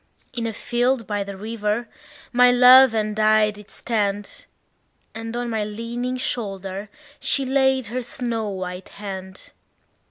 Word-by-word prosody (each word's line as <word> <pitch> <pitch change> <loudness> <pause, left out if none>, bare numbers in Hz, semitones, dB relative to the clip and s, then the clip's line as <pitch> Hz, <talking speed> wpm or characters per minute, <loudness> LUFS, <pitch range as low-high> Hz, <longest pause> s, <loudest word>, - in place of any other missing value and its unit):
In 230 -2 -2
a - - -2
field 245 +2 0
by 205 -1 -2
the 200 -1 -8
river 215 +2 -2 0.5
my 250 0 +6
love 250 0 +8
and 215 0 -1
I 215 0 +4
did 210 0 -14
stand, 205 -3 -2 0.7
And 225 +1 -6
on 240 0 -2
my 220 -1 0
leaning 235 +4 -4
shoulder 195 -4 -4 0.3
she 275 - +1
laid 265 -1 +2
her 255 - -1
snow 235 -3 -3
white 185 -1 -6
hand. 190 -2 -8
225 Hz, 135 wpm, -23 LUFS, 205-245 Hz, 0.7 s, love